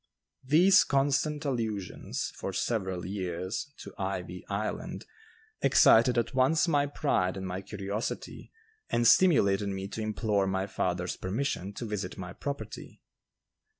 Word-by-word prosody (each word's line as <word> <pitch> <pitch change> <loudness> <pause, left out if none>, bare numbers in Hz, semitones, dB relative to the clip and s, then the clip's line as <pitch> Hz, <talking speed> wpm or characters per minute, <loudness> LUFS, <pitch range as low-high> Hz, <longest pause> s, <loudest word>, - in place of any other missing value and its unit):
These 175 +9 +6
constant 145 +2 +1
allusions, 110 -8 -3
for - - -5
several 95 -6 -2
years, 95 +6 -4
to - - -10
"Ivy 90 -2 -4
Island" 100 +2 -3 0.6
excited 120 +2 +5
at 115 0 0
once 135 +6 +3
my 145 -3 +2
pride 95 -11 0
and 95 - -5
my 90 +1 -4
curiosity 100 +3 -5 0.4
and 120 - +1
stimulated 105 - +4
me 95 0 -4
to 110 - -5
implore 105 -2 0
my 95 0 0
father's 90 -2 -2
permission 100 -1 -2
to 120 - -5
visit 105 -2 -4
my 90 -1 -7
property. 140 -4 -7
105 Hz, 125 wpm, -29 LUFS, 95-135 Hz, 0.6 s, These